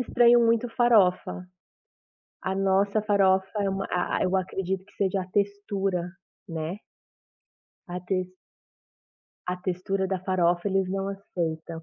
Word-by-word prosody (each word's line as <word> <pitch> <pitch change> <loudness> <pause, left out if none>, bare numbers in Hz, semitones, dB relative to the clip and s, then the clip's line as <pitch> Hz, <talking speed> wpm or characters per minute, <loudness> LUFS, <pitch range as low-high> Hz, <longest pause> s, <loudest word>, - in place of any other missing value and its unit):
estranham 240 -1 +5
muito 230 +1 +2
farofa. 200 -6 +3 1.0
A 190 - -1
nossa 195 +2 +2
farofa 190 -2 +3 0.2
é 195 - +1
uma 195 0 -2
a 180 0 0
a - - 0
eu 185 +1 +1
acredito 190 0 -2
que 205 - -24
seja 195 -1 0
a 180 - -9
textura, 195 -3 -1 0.4
né. 165 +4 -4 1.1
A 180 +1 -4
tex 185 -1 -2 1.1
a 180 - -1
textura 190 +1 -1
da 190 -1 -2
farofa 180 0 +1
eles 190 -1 +1
não 195 +1 -2
aceitam. 165 -4 -4
190 Hz, 130 wpm, -26 LUFS, 180-200 Hz, 1.1 s, estranham